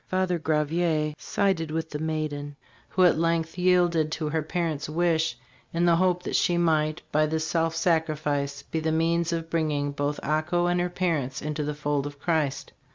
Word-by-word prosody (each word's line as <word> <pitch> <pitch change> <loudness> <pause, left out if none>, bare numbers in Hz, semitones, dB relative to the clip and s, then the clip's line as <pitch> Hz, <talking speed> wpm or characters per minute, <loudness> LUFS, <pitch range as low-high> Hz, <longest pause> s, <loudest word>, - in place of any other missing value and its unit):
Father 185 -2 0
Gravier 155 0 0
sided 190 -6 0
with 160 +1 -3
the 150 - -4
maiden, 155 -2 -3 0.3
who 185 - +2
at 175 -3 +5
length 165 -1 0
yielded 175 -3 +3
to 155 -2 -2
her 160 +1 0
parent's 155 -2 -2
wish 165 0 +1 0.3
in 170 +1 +1
the 170 -1 +5
hope 180 0 +2
that - - -3
she 175 - +2
might, 155 -2 +1
by 155 +1 +3
this 160 +1 -1
self 165 0 0
sacrifice, 150 -5 0
be 160 - -3
the 160 0 0
means 165 +1 +1
of 165 -1 -3
bi 165 - +2
inging 145 -2 -1
both 145 +1 -1
Ako 155 +4 +1
and 175 0 +1
her 180 - 0
parents 165 -8 -1
into 150 0 -3
the 150 0 -3
fold 145 -1 -1
of 145 0 -9
Christ. 145 -4 -1
160 Hz, 185 wpm, -26 LUFS, 150-170 Hz, 0.3 s, at